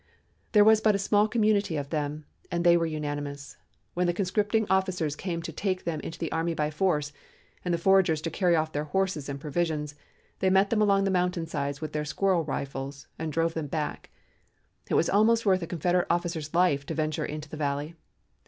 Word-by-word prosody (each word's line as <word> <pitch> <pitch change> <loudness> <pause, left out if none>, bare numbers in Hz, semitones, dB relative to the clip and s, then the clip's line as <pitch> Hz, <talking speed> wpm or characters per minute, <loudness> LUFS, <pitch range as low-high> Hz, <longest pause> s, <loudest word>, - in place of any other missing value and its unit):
There 210 -2 +7
was 220 0 +6
but 215 -1 +4
a - - +2
small 205 +1 +3
community 210 -6 +1
of 140 -1 -5
them 150 -1 -3 0.3
and 170 0 0
they 175 -1 +6
were 165 -1 +2
unanimous. 145 -2 -5 0.4
When 180 0 +1
the 175 - 0
conscripting 205 +3 +1
officers 185 -6 0
came 170 -2 -4
to 165 - -5
take 185 +3 -2
them 165 -2 -2
into 160 - -7
the 165 - -4
army 165 +1 -1
by 150 -1 -1
force 150 -3 0 0.5
and 180 - -1
the 170 - +2
foragers 180 -2 +3
to 165 - -2
carry 175 0 +2
off 155 -1 0
their 150 0 -2
horses 160 -3 -1
and 140 0 -4
provisions, 150 0 -2 0.5
they 190 - +2
met 195 +1 +3
them 220 -2 +2
along 200 -1 +4
the 195 - +1
mountain 180 -2 0
sides 140 -3 -3
with 155 - -5
their 150 0 -1
squirrel 180 +3 +1
rifles 140 -1 -5
and 160 -1 -3
drove 165 +2 0
them 160 -3 -3
back; 150 +1 -4 0.8
it - - +1
was 170 - +3
almost 225 +3 +3
worth 190 -2 +3
a 170 - -4
Confederate 175 +2 0
officer's 170 -3 -1
life 175 -6 +3
to 160 - -3
venture 155 0 -1
into 150 0 -5
the 150 - -8
valley. 145 +1 -2
165 Hz, 205 wpm, -27 LUFS, 150-190 Hz, 0.8 s, There